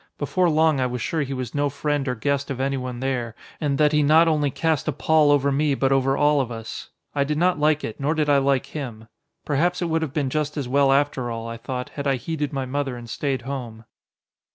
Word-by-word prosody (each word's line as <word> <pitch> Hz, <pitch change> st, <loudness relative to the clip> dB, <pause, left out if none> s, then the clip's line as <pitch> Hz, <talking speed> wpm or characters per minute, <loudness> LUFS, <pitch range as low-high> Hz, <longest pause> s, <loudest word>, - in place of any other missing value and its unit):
Before 175 Hz, +4 st, +1 dB
long 155 Hz, -2 st, +3 dB
I 130 Hz, -, +1 dB
was 125 Hz, 0 st, -4 dB
sure 160 Hz, +6 st, -1 dB
he 135 Hz, -1 st, -3 dB
was 130 Hz, -3 st, -5 dB
no 145 Hz, 0 st, +1 dB
friend 145 Hz, 0 st, -2 dB
or 125 Hz, -, 0 dB
guest 140 Hz, +4 st, -1 dB
of 135 Hz, -2 st, -4 dB
anyone 130 Hz, -2 st, -2 dB
there, 125 Hz, -4 st, -2 dB, 0.2 s
and 140 Hz, -3 st, 0 dB
that 150 Hz, -1 st, +4 dB
he 150 Hz, -1 st, +3 dB
not 155 Hz, +3 st, +5 dB
only 150 Hz, -3 st, +2 dB
cast 160 Hz, 0 st, -1 dB
a -, -, +2 dB
pall 155 Hz, -2 st, +3 dB
over 140 Hz, -1 st, +3 dB
me 145 Hz, 0 st, +1 dB
but 135 Hz, 0 st, +1 dB
over 135 Hz, 0 st, +2 dB
all 145 Hz, -1 st, +3 dB
of 125 Hz, -2 st, -4 dB
us. 115 Hz, -1 st, -7 dB, 0.2 s
I 140 Hz, -, +2 dB
did 150 Hz, +1 st, -2 dB
not 175 Hz, 0 st, +2 dB
like 150 Hz, 0 st, +2 dB
it, 110 Hz, -, -5 dB
nor 145 Hz, +3 st, 0 dB
did 155 Hz, -1 st, +1 dB
I 145 Hz, -1 st, +4 dB
like 135 Hz, -1 st, +1 dB
him. 120 Hz, -7 st, -7 dB, 0.4 s
Perhaps 170 Hz, +5 st, +1 dB
it 175 Hz, -, -1 dB
would 160 Hz, 0 st, +1 dB
have 160 Hz, -4 st, -2 dB
been 140 Hz, -3 st, -1 dB
just 150 Hz, 0 st, -2 dB
as 140 Hz, -4 st, -2 dB
well 140 Hz, +1 st, +3 dB
after 135 Hz, -3 st, +1 dB
all, 115 Hz, 0 st, -5 dB
I 115 Hz, 0 st, -5 dB
thought, 125 Hz, +2 st, -5 dB
had 140 Hz, -1 st, -5 dB
I 135 Hz, -, +3 dB
heeded 150 Hz, +3 st, -3 dB
my 135 Hz, -2 st, -2 dB
mother 135 Hz, -1 st, -2 dB
and 120 Hz, -1 st, -9 dB
stayed 130 Hz, +2 st, -2 dB
home. 120 Hz, -4 st, -6 dB
140 Hz, 245 wpm, -23 LUFS, 130-150 Hz, 0.4 s, not